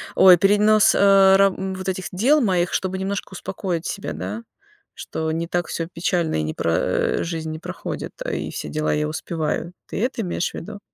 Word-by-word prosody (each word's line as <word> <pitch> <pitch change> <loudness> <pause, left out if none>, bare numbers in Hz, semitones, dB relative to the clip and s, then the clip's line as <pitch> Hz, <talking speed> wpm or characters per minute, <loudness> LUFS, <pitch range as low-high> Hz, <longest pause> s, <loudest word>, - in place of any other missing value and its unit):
ой, 185 -2 +8
перенос, 210 +3 +4
э, 195 -1 +6
ра 195 0 +5
вот 190 0 -4
этих 185 -1 -3
дел 255 +11 +4
моих, 180 -6 +1
чтобы 190 0 -1
немножко 195 0 -4
успокоить 180 -2 -4
себя, 200 - -4
да? 230 +2 -5 0.5
Что 160 0 -4
не 165 +1 -2
так 175 0 -1
всё 165 -1 -3
печально, 170 -1 0
и - - -1
не 80 0 -3
пра 85 - 0
э, - - 0
и - - -1
жизнь 160 -2 -4
не 155 - -6
проходит, - - -6 0.2
и - - -3
все - - -5
дела 155 0 -1
я 150 0 0
успеваю. 160 +1 -3
Ты - - -4
это 245 -2 -1
имеешь 180 -3 -2
в - - -12
виду? 205 +4 -7
185 Hz, 200 wpm, -22 LUFS, 165-195 Hz, 0.5 s, ой